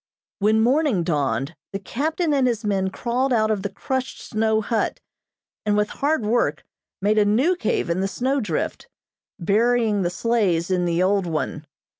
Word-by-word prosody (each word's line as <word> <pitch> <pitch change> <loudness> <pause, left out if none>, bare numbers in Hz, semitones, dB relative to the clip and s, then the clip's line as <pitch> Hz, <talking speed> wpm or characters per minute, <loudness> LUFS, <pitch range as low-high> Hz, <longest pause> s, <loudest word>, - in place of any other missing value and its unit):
When 215 +2 +3
morning 255 - +2
dawned, 145 -1 -1 0.2
the - - -1
captain 305 - -1
and 270 -3 +3
his 230 -2 -1
men 195 -2 +1
crawled 250 +6 -1
out 220 -2 +2
of 210 -3 0
the 200 - -3
crushed 260 +6 -3
snow 220 -1 0
hut, 220 +1 -1 0.6
and, 210 -1 +1
with 210 0 +1
hard 285 -4 +1
work, 185 -10 0 0.4
made 215 +1 +3
a - - +5
new 255 - +3
cave 245 - -1
in 170 +2 0
the 195 - +1
snow 260 +8 0
drift, 175 -8 -3 0.5
burying 220 +2 +2
the 175 - +1
sleighs 190 -4 0
in 180 -1 +1
the 170 +1 +1
old 195 -1 +2
one. 155 -1 -3
210 Hz, 170 wpm, -23 LUFS, 185-245 Hz, 0.6 s, a